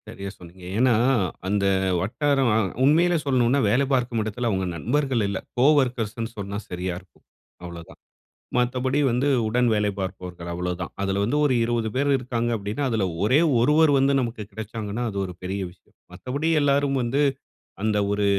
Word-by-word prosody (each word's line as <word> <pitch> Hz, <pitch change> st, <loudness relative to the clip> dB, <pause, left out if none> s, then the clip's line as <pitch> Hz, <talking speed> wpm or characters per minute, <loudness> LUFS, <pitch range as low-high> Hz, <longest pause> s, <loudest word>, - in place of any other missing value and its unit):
சரியா 100 Hz, 0 st, -7 dB
சொன்னீங்க. 90 Hz, +1 st, -14 dB
ஏன்னா, 125 Hz, +1 st, +4 dB, 0.5 s
அந்த 100 Hz, 0 st, +1 dB, 0.4 s
வட்டாரம் 135 Hz, -, +1 dB
அ -, -, +4 dB, 0.3 s
உண்மையிலே 170 Hz, +5 st, +4 dB
சொல்லணுனா, 130 Hz, 0 st, +2 dB
வேல 125 Hz, +7 st, +3 dB
பார்க்கும் 120 Hz, -3 st, 0 dB
இடத்தில 115 Hz, +3 st, -2 dB
அவங்க 95 Hz, -3 st, 0 dB
நண்பர்கள் 130 Hz, -, 0 dB
இல்ல. 100 Hz, -1 st, -2 dB, 0.2 s
கோவொர்க்கர்ஸ்ன்னு 120 Hz, -5 st, +2 dB
சொன்னா 100 Hz, 0 st, -4 dB
சரியா 90 Hz, 0 st, -3 dB
இருக்கும் 90 Hz, -1 st, -25 dB, 0.4 s
அவ்வளோதான். 85 Hz, -1 st, -10 dB, 0.6 s
மத்தபடி 130 Hz, +3 st, +1 dB
வந்து 125 Hz, +4 st, +1 dB, 0.2 s
உடன் 125 Hz, +3 st, +2 dB
வேலை 105 Hz, -1 st, +1 dB
பார்ப்பவர்கள் 90 Hz, -2 st, -6 dB
அவ்வளோதான் 90 Hz, 0 st, -4 dB
அதில 100 Hz, 0 st, 0 dB
வந்து 120 Hz, +8 st, 0 dB
ஒரு 140 Hz, -, +3 dB
20 115 Hz, -1 st, 0 dB
பேர் 140 Hz, +2 st, +1 dB
இருக்காங்க 120 Hz, -2 st, -2 dB
அப்டின்னா 105 Hz, +6 st, -3 dB
அதில 110 Hz, -4 st, 0 dB, 0.2 s
ஒரே 130 Hz, +8 st, +4 dB, 0.2 s
ஒருவர் 150 Hz, +5 st, +4 dB
வந்து 135 Hz, +1 st, +3 dB
நமக்கு 115 Hz, -3 st, -3 dB
கிடைச்சாங்கன்னா, 110 Hz, +1 st, -5 dB
அது 100 Hz, -, -6 dB
ஒரு 90 Hz, -, -7 dB
பெரிய 95 Hz, +2 st, -3 dB
விஷயம். 90 Hz, -, -26 dB, 0.2 s
மத்தபடி 140 Hz, +6 st, -3 dB
எல்லாரும் 140 Hz, -1 st, +2 dB
வந்து 125 Hz, +5 st, 0 dB, 0.6 s
அந்த 105 Hz, 0 st, +1 dB
ஒரு 100 Hz, 0 st, +1 dB
115 Hz, 155 wpm, -24 LUFS, 100-130 Hz, 0.6 s, ஏன்னா